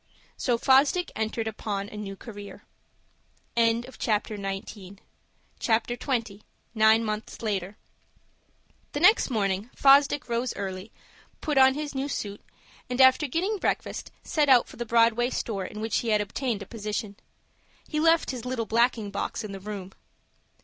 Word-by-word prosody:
So 245 -3 0
Fosdick 275 +8 +3
entered 220 +1 -2
upon 205 -2 -3
a - - -11
new 205 -2 -6
career. 205 -1 -10 0.9
CHAPTER 230 -2 0
XX. 195 0 -6 1.8
NINE 220 0 +5
MONTHS 215 +1 -5
LATER 200 -2 -2 1.2
The 290 - -1
next 365 +3 +5
morning 200 -2 -1
Fosdick 280 +1 +5
rose 240 +1 -1
early, 190 +2 -5 0.5
put 295 -3 +1
on 265 0 +6
his 295 -1 -4
new 270 +1 -2
suit, 205 -7 -5 0.5
and, 250 +1 -3
after 260 +3 +6
getting 380 - -1
breakfast, - - -2
set 300 -3 +1
out 250 -3 +6
for - - -13
the 240 0 -4
Broadway 235 +1 +3
store 200 -7 -3
in 210 - -8
which 220 -1 0
he 235 - -5
had 215 -1 +3
obtained 210 +1 -2
a - - -11
position. 210 -1 -4 0.7
He 305 - -2
left 330 -1 +3
his 250 -3 -6
little 250 -2 -2
blacking 230 -2 +1
box 200 - -3
in 210 - -6
the 195 - -7
room. 195 -1 -7
225 Hz, 145 wpm, -27 LUFS, 205-260 Hz, 1.8 s, on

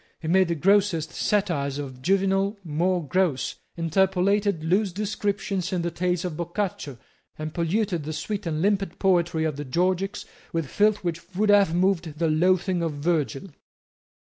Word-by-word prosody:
He 160 - -6
made 185 +2 +4
the 170 - -1
grossest 185 -2 +2
satires 165 -10 0
of 130 -3 -7
Juvenal 195 +4 +1
more 170 +1 0
gross, 180 -8 0 0.2
interpolated 190 +2 +1
loose 190 +4 +1
descriptions 200 -1 -2
in 180 -2 -1
the 170 - -1
tales 180 +1 -1
of 175 -4 -3
Boccaccio, 170 - -3 0.4
and 155 0 -5
polluted 175 0 0
the 155 - -3
sweet 205 +4 -4
and 155 0 -1
limpid 195 -3 0
poetry 175 -4 +2
of 155 -3 -1
the 145 - -4
Georgics 185 +7 -1 0.3
with 165 -2 -1
filth 210 +6 +2
which 170 +1 -5
would 210 +2 +1
have 200 -5 +5
moved 175 -4 +1
the 165 0 +1
loathing 180 +3 +2
of 165 -2 -1
Virgil. 150 +2 -1
180 Hz, 155 wpm, -25 LUFS, 160-195 Hz, 0.4 s, have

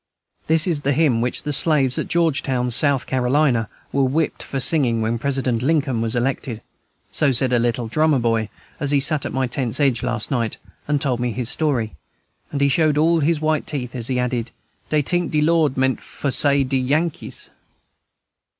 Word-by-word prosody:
This 160 0 +4
is 165 -5 -1
the 140 0 0
hymn 135 -6 +2
which 125 +1 -2
the 150 - -2
slaves 140 -4 +3
at - - -3
Georgetown, 135 -7 0
South 140 +2 +3
Carolina, 125 -2 +1 0.2
were 140 - +1
whipped 145 +5 -1
for 135 - -4
singing 130 -5 +2
when 115 +1 -1
President 130 -3 -1
Lincoln 135 -4 0
was 115 +1 -2
elected. 120 -2 -2 0.5
So 145 -3 +2
said 125 0 +2
a 120 - +3
little 120 0 -1
drummer 155 +5 +2
boy, 115 -3 0 0.3
as 145 - -1
he 145 0 +3
sat 145 +1 +1
at - - -7
my 130 0 -1
tent's 125 -1 -2
edge 135 -4 +2
last 120 -3 -2
night 115 -4 -1 0.3
and 145 -1 +1
told 130 -4 0
me 125 0 -1
his 120 0 -2
story; 130 - 0 0.6
and 140 - -3
he 140 - +4
showed 150 +1 +2
all 165 +2 +3
his 155 +1 0
white 155 0 0
teeth 125 -5 -4
as 120 -3 -3
he 130 - -1
added, 125 -1 -2 0.4
"Dey 150 -1 +1
tink 175 +3 +1
'de 150 - 0
Lord' 160 -4 +2
meant 130 0 0
for 140 - -4
say 140 +1 +4
de 135 0 -1
Yankees." 150 +6 -2
135 Hz, 190 wpm, -21 LUFS, 125-150 Hz, 0.6 s, This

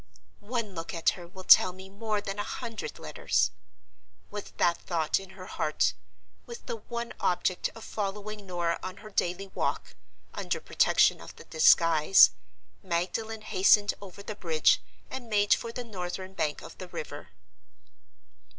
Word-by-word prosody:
"One 230 -4 -2
look 165 0 -5
at 165 - +3
her 175 -2 -9
will 185 +2 -11
tell 185 0 +7
me 190 +1 -11
more 210 +1 -3
than 200 0 -5
a - - 0
hundred 230 -1 -6
letters!" - - 0 0.8
With 205 -1 -7
that 170 -1 +2
thought 165 -2 0
in 190 0 -13
her 185 - -9
heart, 155 -4 0 0.5
with 470 0 -9
the 480 -2 -4
one 235 - -5
object 180 0 0
of 225 - -10
following 210 0 -5
Norah 175 -2 -1
on 185 0 -6
her 215 - -9
daily 195 +1 -1
walk, - - -3 0.4
under - - -2
protection - - +3
of - - -11
the - - -12
disguise, 155 - +6 0.5
Magdalen 195 +5 -2
hastened 205 0 +4
over 200 0 -10
the 215 - -5
bridge, 165 -6 +3 0.3
and 245 -3 -6
made 205 -1 +4
for 230 - -2
the 245 +1 -5
northern 190 -3 -6
bank 150 -5 -2
of - - -11
the 185 - -7
river. 145 - -7
195 Hz, 155 wpm, -29 LUFS, 175-215 Hz, 0.8 s, tell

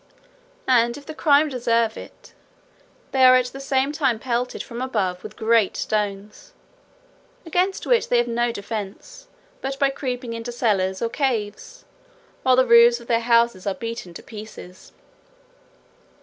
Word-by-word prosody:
And 240 -1 +3
if 285 - -12
the 315 - -7
crime 300 0 +3
deserve 235 -3 0
it, - - -13 0.8
they 265 -1 +2
are 255 0 +8
at 255 -1 +3
the 270 - -8
same 275 0 0
time 275 -6 0
pelted 245 +1 -3
from 235 0 -8
above 195 -8 -2
with - - -10
great 220 -2 +2
stones, 210 - -4 0.9
against 360 +4 -1
which 485 -2 +2
they 245 - +3
have 240 0 +2
no 240 0 0
defence 220 - -7 0.3
but 270 0 -4
by 275 -1 +2
creeping 250 -3 -4
into 230 +1 -5
cellars 200 -5 0
or 230 - 0
caves, 245 - -3 0.6
while 255 -1 +4
the 260 0 +4
roofs 235 0 +6
of 235 - -13
their 230 -1 +1
houses 235 -4 +2
are 195 - -1
beaten 230 -7 -7
to - - -9
pieces. 210 -4 -11
235 Hz, 150 wpm, -22 LUFS, 220-265 Hz, 0.9 s, are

